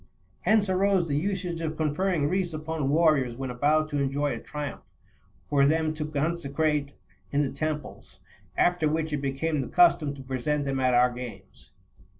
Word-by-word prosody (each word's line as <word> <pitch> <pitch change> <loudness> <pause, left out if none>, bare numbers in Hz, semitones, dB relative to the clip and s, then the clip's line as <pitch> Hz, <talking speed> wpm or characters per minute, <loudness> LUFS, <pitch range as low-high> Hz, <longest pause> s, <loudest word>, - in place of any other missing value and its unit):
29 215 +5 +5
Hence 205 -2 +2
arose 190 -1 +2
the 145 - -1
usage 180 0 -2
of 160 -1 -3
conferring 155 0 0
wreaths 180 0 -1
upon 155 -2 -2
warriors 150 -6 +3
when 130 0 -4
about 150 +5 +2
to 145 -2 -2
enjoy 140 +1 0
a 115 - -5
triumph, 150 +2 -7 0.5
for 140 -1 +3
them 155 +2 +2
to 155 -1 -4
conse 155 0 -2
crate 150 -2 0 0.4
in 145 +1 +2
the 135 - -2
temples: 155 -1 -5 0.4
after 175 -3 +3
which 160 0 -1
it - - +1
became 140 +2 -1
the - - -4
custom 160 - +4
to 135 - -10
present 135 +3 -1
them 135 -1 -1
at 130 -1 +3
our 125 +1 +5
games. 115 -6 -10
150 Hz, 175 wpm, -27 LUFS, 140-160 Hz, 0.5 s, 29